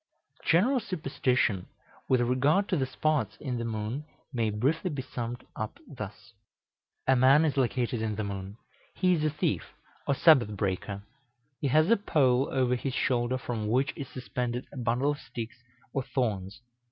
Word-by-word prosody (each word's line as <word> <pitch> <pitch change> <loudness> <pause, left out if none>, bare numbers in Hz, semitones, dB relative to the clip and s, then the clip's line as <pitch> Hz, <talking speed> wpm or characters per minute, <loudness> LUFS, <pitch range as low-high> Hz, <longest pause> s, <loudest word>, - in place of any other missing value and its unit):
}] - - -46
The - - -4
general 235 +11 +4
superstition 130 - 0 0.4
with 130 -2 +4
regard 135 +11 +3
to 190 - +2
the 135 -5 0
spots 145 -8 0
in 125 -4 -3
the - - -2
moon 115 +5 -3 0.3
may 115 -3 +1
briefly 140 - 0
be 145 -5 -3
summed 120 -2 -5
up - - -4
thus: - - -8 0.7
A 130 - +5
man 135 +5 +6
is 150 - +1
located 125 -2 0
in 110 -1 -1
the 110 - -2
moon; 100 0 -5 0.4
he 185 -1 +3
is 155 -3 0
a 155 - +3
thief 150 +1 -2 0.3
or 140 - +3
Sabbath 125 -10 +5
breaker; 100 +1 -2 0.6
he 145 - 0
has 155 - +4
a 230 - +6
pole 135 -9 +2
over 130 -2 +2
his 130 +1 -3
shoulder, 125 0 +1
from 115 -4 -3
which 130 +5 +1
is 140 - -5
suspended 125 0 -3
a - - -9
bundle 125 +4 +1
of 145 - -4
sticks 115 +1 -7 0.3
or 135 - +1
thorns. 110 -5 -2
125 Hz, 175 wpm, -29 LUFS, 115-145 Hz, 0.7 s, man